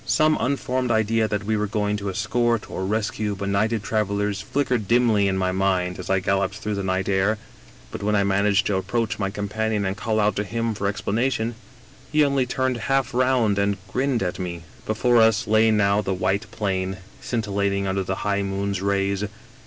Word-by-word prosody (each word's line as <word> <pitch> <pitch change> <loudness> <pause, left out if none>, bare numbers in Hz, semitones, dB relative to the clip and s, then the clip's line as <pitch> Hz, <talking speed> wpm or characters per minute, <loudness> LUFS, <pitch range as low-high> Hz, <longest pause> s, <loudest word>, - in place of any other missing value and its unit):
" - - -25
Some 155 +5 +3
unformed 130 -1 -1
idea 110 0 +2
that 105 -1 -2
we 110 +1 0
were 105 0 0
going 105 0 -1
to 100 -1 -4
escort, 110 +3 0
or 95 - -3
rescue, 110 0 -1
benighted 100 +3 0
travelers 105 -2 -1
flickered 125 -6 -1
dimly 115 -4 +3
in 95 -1 0
my 95 -1 +1
mind 95 -1 0
as 90 - -7
I 95 0 +3
galloped 100 +1 0
through 105 -1 -3
the 100 - -2
night 95 0 -1
air; 100 +2 +2 0.5
but - - -6
when 105 +1 +1
I 100 - +3
managed 100 +1 +2
to 100 - +1
approach 105 +5 -1
my 100 -1 0
companion 105 +1 -2
and 95 0 -1
called 110 +1 -1
out 105 0 +2
to 105 - +1
him 115 +2 -2
for 100 -1 -2
ex 100 - -3
planation, 115 +1 0 0.6
he 150 -1 +4
only 140 -2 +1
turned 130 0 0
half 135 -2 +1
round 125 -5 +2
and 100 0 +1
grinned 130 -1 0
at 90 0 -3
me. 85 -2 -5
" - - -24
Before 120 +3 +2
us 110 -2 +4
lay 110 +1 +4
now 105 -1 +3
the 95 -2 -2
white 100 +4 -1
plain, 95 -3 -2 0.2
scintillating 100 -4 -1
under 95 0 0
the 95 0 -2
high 100 -1 +1
moon's 100 -1 -2
rays. 100 0 0
105 Hz, 200 wpm, -23 LUFS, 100-115 Hz, 0.6 s, he